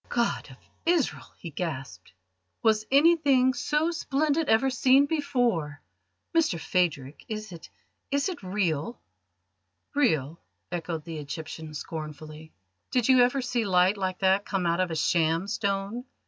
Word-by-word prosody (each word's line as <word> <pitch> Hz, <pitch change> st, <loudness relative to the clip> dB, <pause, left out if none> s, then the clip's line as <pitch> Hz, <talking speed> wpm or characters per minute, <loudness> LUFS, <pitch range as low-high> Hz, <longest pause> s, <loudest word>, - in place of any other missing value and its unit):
"God 235 Hz, -1 st, -1 dB
of -, -, -13 dB, 0.3 s
Israel," 335 Hz, -5 st, 0 dB
he 170 Hz, -, -8 dB
gasped, 140 Hz, -, -6 dB, 0.5 s
"was 215 Hz, -1 st, +2 dB
anything 280 Hz, -3 st, +4 dB
so 300 Hz, +6 st, 0 dB
splendid 310 Hz, -1 st, 0 dB
ever 265 Hz, +5 st, +3 dB
seen 265 Hz, +1 st, +4 dB
before! 245 Hz, -, 0 dB, 0.6 s
Mr 320 Hz, -, +2 dB
Phadrig, 155 Hz, -6 st, -1 dB
is 215 Hz, -2 st, -5 dB
it 170 Hz, -2 st, -11 dB, 0.4 s
is 280 Hz, +4 st, +1 dB
it 365 Hz, -5 st, -5 dB
real?" 185 Hz, 0 st, -2 dB, 0.9 s
"Real?" 160 Hz, -, +1 dB, 0.3 s
echoed 165 Hz, -2 st, -4 dB
the 165 Hz, -2 st, -6 dB
Egyptian 155 Hz, +1 st, -7 dB
scornfully. 155 Hz, 0 st, -7 dB, 0.4 s
"Did 250 Hz, -1 st, +1 dB
you 255 Hz, -1 st, +7 dB
ever 250 Hz, +2 st, +2 dB
see 240 Hz, -1 st, -1 dB
light 185 Hz, 0 st, +3 dB
like 185 Hz, -2 st, -2 dB
that 190 Hz, +1 st, +3 dB
come 195 Hz, -3 st, -2 dB
out 170 Hz, +1 st, +1 dB
of 185 Hz, -1 st, +1 dB
a 165 Hz, -, -3 dB
sham 165 Hz, +2 st, +1 dB
stone? 200 Hz, +3 st, -2 dB
195 Hz, 135 wpm, -27 LUFS, 165-260 Hz, 0.9 s, you